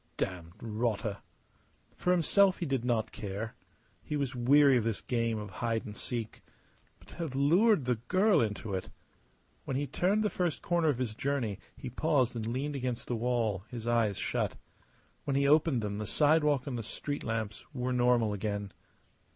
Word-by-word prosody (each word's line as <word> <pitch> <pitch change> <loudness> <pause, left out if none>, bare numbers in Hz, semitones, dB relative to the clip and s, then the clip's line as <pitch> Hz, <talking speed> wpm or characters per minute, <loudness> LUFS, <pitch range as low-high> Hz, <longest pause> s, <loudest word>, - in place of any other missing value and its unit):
Damned 85 -3 -3
rotter! 110 -2 -1 0.8
For - - -2
himself 185 +2 +4
he 175 - -3
did 135 -5 -1
not 120 -3 0
care. 105 +2 -5 0.5
He 150 - -4
was 140 -2 -1
weary 135 +3 +5
of 120 - +2
this 115 -2 -1
game 115 -2 -1
of 105 -2 -6
hide 115 +3 -2
and 105 - -7
seek. 115 0 -5 0.6
But - - -20
to - - -12
have 160 -6 -4
lured 170 - +4
the 125 -2 +1
girl 195 +2 +4
into 105 -2 -2
it! 95 - -3 0.8
When 135 - -1
he 145 - 0
turned 190 - +1
the 210 - +1
first 175 -4 -1
corner 170 -2 +2
of 140 - +1
his 125 -4 -2
journey 120 -5 -2 0.2
he 125 - -7
paused 135 -3 +1
and 110 -1 -3
leaned 135 +5 -2
against 125 -3 -3
the 120 - -1
wall, 115 -5 0
his 120 -3 -6
eyes 115 -4 +2
shut. - - -1 0.7
When 140 - 0
he 140 0 +3
opened 150 -5 +4
them 105 0 -3
the 105 - -4
sidewalk 150 0 +3
and 125 -4 -3
the - - -2
street 145 +6 -5
lamps 110 -2 -3
were 130 -2 -2
normal 120 -3 +3
again. 100 -1 -3
125 Hz, 180 wpm, -31 LUFS, 110-145 Hz, 0.8 s, weary